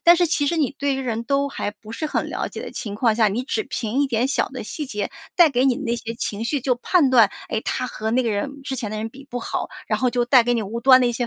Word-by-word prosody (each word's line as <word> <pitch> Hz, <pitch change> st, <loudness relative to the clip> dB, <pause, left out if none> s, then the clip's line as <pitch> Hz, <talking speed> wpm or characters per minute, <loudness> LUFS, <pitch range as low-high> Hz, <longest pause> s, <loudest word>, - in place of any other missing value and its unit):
但 345 Hz, 0 st, +7 dB
是 350 Hz, -, +3 dB
其 300 Hz, -3 st, 0 dB
实 335 Hz, -, +1 dB
你 290 Hz, -3 st, 0 dB
对 280 Hz, -1 st, +1 dB
于 270 Hz, -, -3 dB
人 235 Hz, -3 st, -3 dB
都 280 Hz, +1 st, +1 dB
还 205 Hz, -, -3 dB
不 215 Hz, +1 st, -13 dB
是 310 Hz, -, -3 dB
很 -, -, -2 dB
了 -, -, -2 dB
解 -, -, -7 dB
的 -, -, -6 dB
情 205 Hz, -4 st, -5 dB
况 225 Hz, 0 st, +2 dB
下， 220 Hz, -1 st, +4 dB
你 225 Hz, +6 st, -2 dB
只 420 Hz, +10 st, -2 dB
凭 235 Hz, +3 st, -2 dB
一 285 Hz, -, +2 dB
点 240 Hz, +1 st, 0 dB
小 -, -, +1 dB
的 260 Hz, -4 st, -7 dB
细 295 Hz, +6 st, -5 dB
节 205 Hz, -5 st, -3 dB, 0.3 s
带 345 Hz, -4 st, +7 dB
给 255 Hz, 0 st, +2 dB
你 255 Hz, -, +3 dB
那 235 Hz, -1 st, -2 dB
些 230 Hz, 0 st, -5 dB
情 220 Hz, -2 st, -4 dB
绪 285 Hz, -3 st, -1 dB
就 255 Hz, -2 st, +2 dB
判 280 Hz, +2 st, +3 dB
断， 230 Hz, -6 st, +6 dB, 0.2 s
哎， 220 Hz, -, 0 dB
他 255 Hz, -, -1 dB
和 220 Hz, -2 st, -4 dB
那 255 Hz, +2 st, +2 dB
个 230 Hz, -, 0 dB
人 275 Hz, +7 st, -3 dB
之 270 Hz, -1 st, -4 dB
前 215 Hz, -4 st, -4 dB
的 215 Hz, -, -4 dB
人 220 Hz, +1 st, -4 dB
比 275 Hz, +2 st, -14 dB
不 245 Hz, -, -3 dB
好， -, -, -3 dB, 0.2 s
然 -, -, 0 dB
后 255 Hz, -, +3 dB
就 245 Hz, 0 st, +1 dB
带 250 Hz, -1 st, +6 dB
给 245 Hz, +1 st, +1 dB
你 225 Hz, -, 0 dB
无 225 Hz, +4 st, -4 dB
端 260 Hz, 0 st, +7 dB
的 245 Hz, -, +4 dB
一 240 Hz, -, +1 dB
些 240 Hz, +1 st, -2 dB
245 Hz, 330 characters per minute, -22 LUFS, 225-275 Hz, 0.3 s, 但